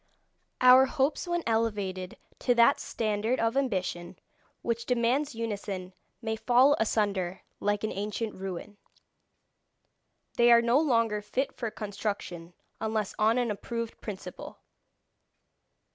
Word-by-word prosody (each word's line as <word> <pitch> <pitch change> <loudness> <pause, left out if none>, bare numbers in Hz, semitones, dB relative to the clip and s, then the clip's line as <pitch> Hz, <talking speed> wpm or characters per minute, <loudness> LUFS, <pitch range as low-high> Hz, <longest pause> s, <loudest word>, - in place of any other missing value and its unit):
Our 255 +1 +8
hopes 285 +5 0
when 345 -1 -1
elevated 205 -5 -1 0.2
to 245 - +2
that 235 +4 +5
standard 220 +2 -1
of 230 +2 +1
ambition 185 -9 -2 0.5
which 235 0 -2
demands 250 +3 +1
unison 200 -5 -4 0.3
may 220 -1 -1
fall 255 +5 +4
asunder 200 -4 0 0.2
like 205 0 0
an 215 - -1
ancient 210 +2 -3
ruin. 190 +2 -7 1.6
They 240 0 +6
are 235 0 +7
no 235 +4 +4
longer 230 -8 +2
fit 255 +6 -2
for 235 -3 -4
construction 200 -5 -5 0.3
unless 220 -2 -2
on 220 +3 +3
an 245 -3 +1
approved 230 +2 -5
principle. 200 -3 -8
225 Hz, 115 wpm, -29 LUFS, 205-240 Hz, 1.6 s, Our